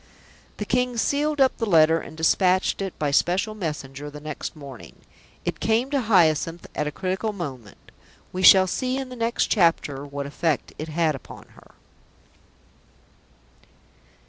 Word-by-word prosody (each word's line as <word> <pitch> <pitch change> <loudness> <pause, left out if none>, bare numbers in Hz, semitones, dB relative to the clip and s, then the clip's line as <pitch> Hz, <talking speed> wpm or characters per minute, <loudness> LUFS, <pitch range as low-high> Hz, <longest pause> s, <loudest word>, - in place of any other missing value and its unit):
The 210 - -4
King 250 +1 0
sealed 295 +5 0
up 265 -1 +4
the 230 - -1
letter 160 -1 +5
and 160 - -11
despatched 185 +4 +2
it 195 -2 -4
by 150 -2 -1
special 190 +9 +1
messenger 150 -7 -5
the 150 0 -10
next 150 +1 -6
morning. 140 -5 -11 0.5
It - - -3
came 230 +5 +1
to 280 -2 +1
Hyacinth 170 - +2
at 150 - -2
a - - -2
critical 190 +6 -2
moment. 130 - -8 0.4
We 185 - -3
shall 190 0 +8
see 255 +7 -2
in 265 -1 -4
the 250 - -8
next 230 0 0
chapter 165 - +2
what 140 0 -5
effect 145 0 -2
it 155 - -4
had 160 0 +1
upon 135 - -11
her. - - -20
175 Hz, 150 wpm, -24 LUFS, 150-220 Hz, 0.5 s, shall